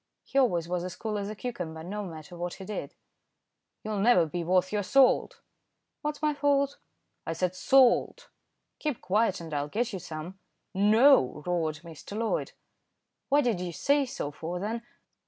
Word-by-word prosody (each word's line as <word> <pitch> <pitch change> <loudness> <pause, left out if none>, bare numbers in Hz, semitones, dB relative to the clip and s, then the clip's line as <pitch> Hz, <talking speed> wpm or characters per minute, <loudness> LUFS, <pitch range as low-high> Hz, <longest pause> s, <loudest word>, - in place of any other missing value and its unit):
He 275 - 0
always 175 -11 +2
was 175 0 -2
as 180 0 -5
cool 215 -2 -3
as 200 0 -4
a 215 - -5
cucumber, 180 -8 -5
no 205 +4 -4
matter 165 -1 -9
what 175 0 -4
he 190 - -9
did. 210 - -5 0.9
"You'll 215 -1 -2
never 200 -5 +5
be 170 +2 -4
worth 185 +2 +2
your 210 - +1
salt." 275 - +3 0.6
"What's 300 0 -4
my 300 0 +3
fault?" 285 -1 +1 0.5
"I 165 - -1
said 180 +2 -1
salt." 265 - +3 0.5
"Keep 300 -6 -2
quiet 200 +1 +1
and 165 -2 -8
I'll 145 0 -1
get 225 +8 -2
you 190 - -3
some." 170 +2 -8 0.3
"No!" 210 - +5
roared 160 -4 -1
Mr. 170 +5 -9
Loyd. 225 0 -1 0.8
"What 290 +1 +4
did 230 -7 +1
you 180 -1 -3
say 280 - +1
so 145 -11 -4
for 165 +4 -5
then? 220 +4 -3
195 Hz, 170 wpm, -28 LUFS, 175-245 Hz, 0.9 s, never